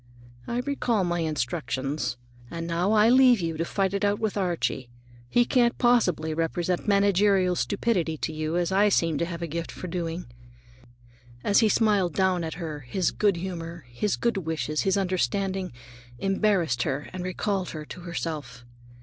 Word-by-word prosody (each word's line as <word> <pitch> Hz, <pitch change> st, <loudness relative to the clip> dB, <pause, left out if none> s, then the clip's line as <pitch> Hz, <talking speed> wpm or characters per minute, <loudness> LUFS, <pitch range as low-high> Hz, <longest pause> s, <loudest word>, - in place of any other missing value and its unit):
"I 240 Hz, +1 st, -1 dB
recall 250 Hz, -6 st, 0 dB
my 175 Hz, -1 st, -1 dB
instructions, 145 Hz, -3 st, -2 dB, 0.3 s
and 165 Hz, 0 st, -5 dB
now 175 Hz, +5 st, +1 dB
I'll 220 Hz, +2 st, +5 dB
leave 255 Hz, -3 st, +6 dB
you 165 Hz, -2 st, -2 dB
to 165 Hz, -, 0 dB
fight 195 Hz, +1 st, 0 dB
it 200 Hz, -, -1 dB
out 205 Hz, 0 st, +2 dB
with 220 Hz, -1 st, -2 dB
Archie. 175 Hz, -9 st, -1 dB, 0.4 s
He 240 Hz, -, +4 dB
can't 240 Hz, -1 st, +2 dB
possibly 190 Hz, -10 st, +2 dB
represent 170 Hz, +3 st, -1 dB
managerial 200 Hz, -2 st, +3 dB
stupidity 185 Hz, -6 st, 0 dB
to 160 Hz, -, -3 dB
you 155 Hz, +2 st, -2 dB
as 175 Hz, +1 st, 0 dB
I 200 Hz, +2 st, +4 dB
seem 165 Hz, -6 st, +1 dB
to 170 Hz, -, +1 dB
have 170 Hz, -1 st, -5 dB
a -, -, -2 dB
gift 165 Hz, +2 st, -4 dB
for -, -, -8 dB
doing." 170 Hz, 0 st, -3 dB, 1.2 s
As 200 Hz, -, +4 dB
he 220 Hz, -2 st, +4 dB
smiled 205 Hz, -6 st, +2 dB
down 185 Hz, -2 st, +2 dB
at 160 Hz, -1 st, -4 dB
her, 160 Hz, -4 st, -5 dB
his 145 Hz, +7 st, -1 dB
good 205 Hz, -3 st, +2 dB
humor, 170 Hz, -3 st, -6 dB
his 155 Hz, +12 st, -1 dB
good 235 Hz, -3 st, 0 dB
wishes, 160 Hz, -3 st, -2 dB
his 195 Hz, 0 st, +1 dB
understanding, 190 Hz, +1 st, -1 dB, 0.5 s
embarrassed 195 Hz, -, +1 dB
her 145 Hz, +1 st, -2 dB
and 185 Hz, -1 st, -4 dB
recalled 185 Hz, +1 st, -2 dB
her 155 Hz, -1 st, -6 dB
to 180 Hz, -, -9 dB
herself. 150 Hz, -8 st, -5 dB
180 Hz, 165 wpm, -26 LUFS, 160-200 Hz, 1.2 s, leave